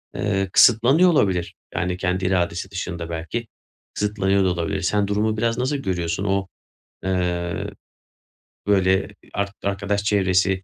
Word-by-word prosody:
,eee, 95 -2 0
kısıtlanıyor 130 +10 +6
olabilir. 95 - +1 0.2
Yani 90 +1 -1
kendi 90 0 -1
iradesi 90 +1 0
dışında 85 -3 -5
belki 85 +8 -4 0.5
kısıtlanıyor 100 -2 +1
da - - +3
olabilir. 90 +3 -2
Sen 100 +2 +1
durumu 110 +2 0
biraz 115 +1 0
nasıl 130 +3 0
görüyorsun? 90 -6 -2
O, 95 -1 0 0.6
eee, 90 -2 -1 1.0
böyle, 95 -1 +3 0.3
ark 100 0 -2
arkadaş 100 +1 -1
çevresi, 95 -2 +2
95 Hz, 125 wpm, -22 LUFS, 90-105 Hz, 1.0 s, kısıtlanıyor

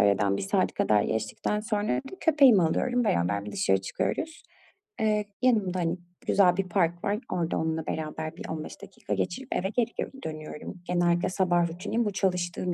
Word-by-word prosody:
aradan 100 0 +3
1 100 - -3
saat 95 - +1
kadar 105 -1 +3
geçtikten 110 - -1
sonra 210 -1 0
bir - - -9
köpeğimi 275 - +6
alıyorum, 245 +9 +1
beraber 100 - +1
bir 105 - -6
dışarı 95 0 +2
çıkıyoruz. 315 - -3 0.6
Eee, 210 -1 +2 0.2
yanımda, 210 -8 +2
hani, 170 +1 0 0.3
güzel 180 -3 +4
bir 195 -2 -1
park 175 0 +1
var. 205 +2 0
Orada 170 -2 0
onunla 160 0 -1
beraber 155 +1 -4
bir - - -7
15 155 -1 -6
dakika - - -6
geçirip 175 - -2
eve 190 +2 0
geri 235 +1 0
gö - - 0 0.2
dönüyorum. 155 +3 -7
Genellikle 175 0 +2
sabah 175 -2 +2
rutinim 210 +7 -2
bu. 205 - 0
Çalıştığım 180 -2 -1
175 Hz, 170 wpm, -28 LUFS, 155-210 Hz, 0.6 s, köpeğimi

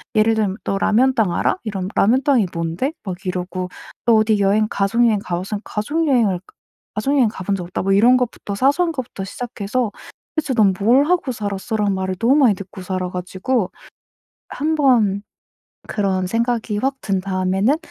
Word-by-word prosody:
예를 215 +1 +4
들면 210 -2 0
"너 195 - -1
라면땅 225 -1 +2
알아?" 170 - +1
이러면 195 -4 -3
"라면땅이 250 0 +3
뭔데?" 170 - -2
막 185 -3 -5
이러고 180 0 -3 0.4
"너 235 - +5
어디 215 -1 +3
여행 205 +2 +3
가족 215 +5 +2
여행 220 -3 +3
가봤어?" 185 +4 -3
"가족 300 +10 -2
여행을 225 -9 +2 0.6
가족 270 +7 0
여행 255 -4 +4
가본 195 -1 -3
적 185 - -4
없다." 175 - -4
뭐 195 +1 +2
이런 240 +6 +6
것부터 235 -4 -3
사소한 285 - +2
것부터 255 -9 -5
시작해서 235 +1 -3 0.4
"대체 295 -4 -1
넌 205 -4 +4
뭘 245 +8 +4
하고 345 -5 +1
살았어?" 205 0 -4
라는 205 -2 +1
말을 190 0 -2
너무 235 +7 +3
많이 260 -9 +5
듣고 190 0 -9
살아 185 -1 -3
가지고 185 +5 -2 0.9
1 310 +2 +1
번 235 -9 +3 0.7
그런 190 -3 0
생각이 230 0 -1
확 270 +2 0
든 195 -2 -1
다음에는 190 +7 +1
210 Hz, 340 characters per minute, -20 LUFS, 190-250 Hz, 0.9 s, 이런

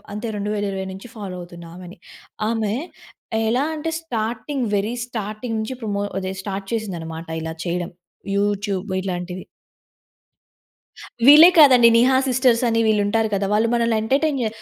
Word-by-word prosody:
అంతే 210 +3 -4
2020 200 -2 -3
నుంచి 195 +5 -10
ఫాలో 200 -4 -6
అవుతున్నా 175 -1 -11
ఆమెని. 180 0 -11 0.5
ఆమె 220 -2 -1 0.7
ఎలా 250 +5 +1
అంటే 320 +2 -3
స్టార్టింగ్ 240 0 -3
వెరీ 210 +4 -1
స్టార్టింగ్ 220 0 -5
నుంచి 220 +4 -4
పరమో 205 -3 -2 0.2
అదె 190 0 -4
స్టార్ట్ 195 0 -5
చేసింది 215 -6 -3
అన్నమాట 165 0 -7 0.2
ఇలా 160 0 -4
చేయడం 175 0 -3 0.5
యూట్యూబ్ 200 -1 -1
ఇలాంటివి. 180 -1 -5 1.8
వీళ్లే 300 +4 +10
కాదండి. 255 -5 +7
'నిహా 255 +3 +4
సిస్టర్స్' 255 -1 +2
అని 225 0 +1
వీళ్ళు 210 -1 +2
ఉంటారు 220 +2 +1
కదా! 200 0 0
వాళ్ళు 220 +2 +2
మనల్ని 230 -1 +1
ఎంటర్టైన్ 275 +4 +1
చే 225 - +1
215 Hz, 140 wpm, -21 LUFS, 195-235 Hz, 1.8 s, వీళ్లే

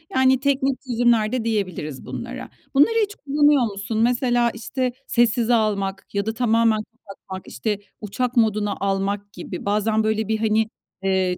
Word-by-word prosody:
Yani, 260 0 +4
teknik 275 -1 0
çözümler 235 -3 +2
de 255 -2 -1
diyebiliriz 185 - -3
bunlara. 255 +2 -6 0.3
Bunları 295 +12 +5
hiç 415 0 -4
kullanıyor 290 -1 +3
musun? 200 +2 -4
Mesela, 240 0 +2
işte, 250 +3 -2 0.2
sessize 240 0 +2
almak 200 -4 0
ya 200 0 0
da 220 - -1
tamamen 230 -2 +2 0.3
kapatmak, 190 -1 -9
işte, 205 +11 -2 0.2
uçak 245 +4 -2
moduna 210 -3 +2
almak 200 +1 -1
gibi. 180 - -7
Bazen, 215 +2 +1
böyle, 220 0 0
bir, 220 0 +1
hani, 220 0 +2 0.3
eee, 190 -2 +1
220 Hz, 150 wpm, -22 LUFS, 200-245 Hz, 0.3 s, Bunları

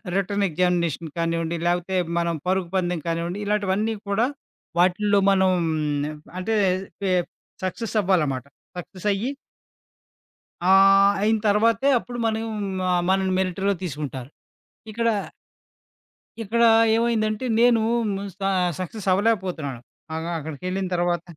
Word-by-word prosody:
Written 200 +1 0
examination 170 -1 0
కానివ్వండి, 165 0 -1
లేకపోతే 175 +2 0 0.2
మనం 170 -1 0
పరుగు 185 -2 0
పందెం 175 -3 0
కానివ్వండి, 170 +4 -2
ఇలాటివన్నీ 210 +1 0
కూడా 220 +5 +2 0.5
వాటిల్లో 200 +3 +3
మనం 190 -1 +3 0.9
అంటే 220 +4 -1 0.5
పె 190 -2 0 0.5
సక్సెస్ 220 +4 -4
అవ్వాలమాట. 150 -9 +1 0.3
సక్సెసయ్యి 195 +6 -2 1.4
ఆహ్, 195 +1 +6
అయిన 220 +1 +3
తర్వాతే 230 +6 +3
అప్పుడు 240 0 -8
మనం 225 0 -1 0.5
ఆహ్, 175 -1 +2
మనల్ని 190 0 +2
మిలిటరీలో 190 +1 0
తీసుకుంటారు. 140 -5 -5 0.6
ఇక్కడ... 230 +2 -1 1.4
ఇక్కడ 235 +3 0 0.3
ఏమైందంటే 225 0 0
నేను 235 -2 +5 0.2
హ్మ్, 200 -2 -2
స - - -43 0.4
సక్సెస్ 195 +2 -6
అవ్వలేకపోతున్నాను. 180 - -1 0.3
ఆగా 165 +1 -4
అక్కడికెళ్ళిన 180 +5 -4
తర్వాత 175 0 0
190 Hz, 105 wpm, -23 LUFS, 175-210 Hz, 1.4 s, ఆహ్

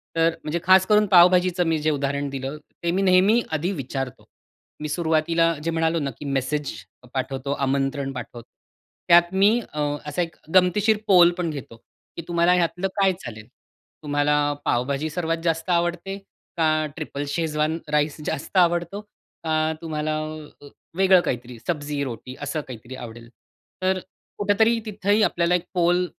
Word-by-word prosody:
तर 165 0 +4
म्हणजे 155 +3 -2
खास 190 +1 +6
करून 210 0 +4
पावभाजीचं 180 0 +5
मी 160 -1 +1
जे 155 +1 0
उदाहरण 140 0 -2
दिलं, 135 +2 -5 0.3
ते 170 - +1
मी 190 +3 0
नेहमी 195 +5 +4
आधी 160 +4 -1
विचारतो. 135 0 -5 0.6
मी 150 - -3
सुरुवातीला 165 +1 +1
जे 165 - -1
म्हणालो 165 0 +1
ना 140 -2 -2
की 150 - -8
मेसेज 140 +1 -1 0.3
अ - - -15
पाठवतो, 135 +1 -3
आमंत्रण 135 0 -1
पाठवतो, 120 -1 -8 0.6
त्यात 175 +1 +5
मी 205 +5 +4
अ, 150 - -4 0.3
असा 150 +4 -2
एक 170 -1 -4 0.2
गमतीशीर 195 +4 +4
पोल 175 -3 +7
पण 175 -2 -1
घेतो 135 -6 -8 0.4
की - - -3
"तुम्हाला 170 +1 +3
ह्यातलं 180 +1 0
काय 195 -1 +5
चालेल? 110 -2 -8 0.6
तुम्हाला 145 0 +1 0.3
पावभाजी 140 +5 0
सर्वात 165 +1 -2
जास्त 165 0 -1
आवडते? 175 +2 0 0.4
का 155 -1 +2
ट्रिपल 150 -3 -5
शेजवान 155 +1 -1
राईस 150 0 +1
जास्त 150 +7 -3
आवडतो? 175 +2 +2 0.4
का 160 - -2 0.3
तुम्हाला 155 -1 -2 0.5
अ 145 - -12 0.3
वेगळं 190 -1 +5
काहीतरी, 125 0 -4
सब्जी-रोटी 140 - -3
असं 145 +2 -2
काहीतरी 125 0 -9
आवडेल?" 120 -1 -10 0.5
तर 185 0 +2 0.4
कुठेतरी 220 +3 +2
तिथेही 210 0 +1
आपल्याला 175 -3 +2
एक 180 0 -2
पोल 175 0 +2
165 Hz, 150 wpm, -23 LUFS, 140-180 Hz, 0.6 s, पोल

